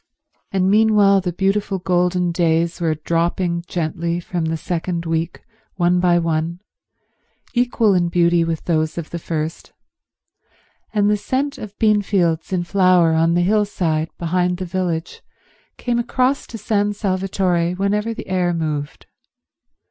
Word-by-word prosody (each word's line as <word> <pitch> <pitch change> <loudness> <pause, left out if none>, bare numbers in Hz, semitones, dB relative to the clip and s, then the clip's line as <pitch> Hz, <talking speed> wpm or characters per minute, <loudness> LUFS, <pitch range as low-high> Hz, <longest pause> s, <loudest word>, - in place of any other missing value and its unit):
And 190 -1 +1
meanwhile 205 -2 +4
the 180 -1 -2
beautiful 195 +2 0
golden 180 -1 +1
days 170 0 +1
were 160 -2 +1
dropping 170 +2 -1
gently 170 0 -2
from 175 -1 -3
the 160 0 -1
second 170 +1 -3
week 165 +1 -2 0.3
one 175 -1 +2
by 175 -1 +3
one, 165 0 -1 0.9
equal 240 -4 +2
in 175 -2 +2
beauty 170 0 +3
with 165 -1 -3
those 155 -2 0
of 165 -2 -5
the 170 - -4
first, 160 0 -4 1.2
and 205 -1 +2
the 210 0 +3
scent 275 +6 -2
of 205 -1 -9
beanfields 195 -7 +1
in 180 -2 0
flower 180 -3 +3
on 165 +1 +2
the 175 - +3
hillside 180 -5 0
behind 180 +1 0
the 185 - -4
village 175 -2 -3 0.6
came 240 -1 -1
across 255 +3 0
to 230 - -7
San 205 -1 0
Salvatore 185 -3 0
whenever 205 +4 0
the 225 - -7
air 180 -2 0
moved. 150 -3 -4
180 Hz, 140 wpm, -20 LUFS, 170-200 Hz, 1.2 s, meanwhile